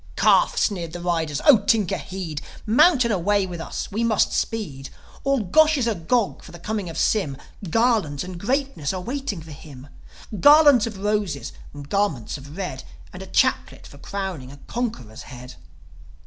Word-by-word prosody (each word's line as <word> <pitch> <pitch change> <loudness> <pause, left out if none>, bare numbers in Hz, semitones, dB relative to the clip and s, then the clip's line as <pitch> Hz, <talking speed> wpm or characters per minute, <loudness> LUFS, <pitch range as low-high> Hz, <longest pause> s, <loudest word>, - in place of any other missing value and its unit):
"' - - -24
"Calf!" - - +3
sneered 170 -6 -1
the 175 - -6
riders. 165 -4 -1
"O 275 -7 +8
Tinker, 205 -2 +1
heed! 180 -6 -6 0.2
Mount 255 +4 +4
and 235 - +1
away 200 +2 +1
with 175 -3 -7
us, - - -5
we 220 +4 -1
must 220 -3 +2
speed. 150 -12 -3 0.3
All 275 -2 +1
Gosh 310 - +4
is 255 - 0
agog 220 +1 0
for - - -13
the 170 - -10
coming 200 +1 -4
of 165 - -7
Sym. 155 -11 0 0.3
Garlands 215 - +1
and 180 -1 -8
greatness 250 - -1
are 185 - -3
waiting 240 - -4
for 160 - -12
him: 140 -2 -12 0.5
Garlands 290 - +7
of 215 -3 -7
roses, 205 -7 -2 0.2
and 145 -1 -10
garments 200 - -1
of 140 +5 -12
red 180 -10 -5 0.3
And - - -9
a - - -8
chaplet - - 0
for 140 - -14
crowning 185 -8 -5
a 140 - -12
conqueror's 215 - -5
head." 125 0 -11
190 Hz, 175 wpm, -23 LUFS, 155-230 Hz, 0.5 s, O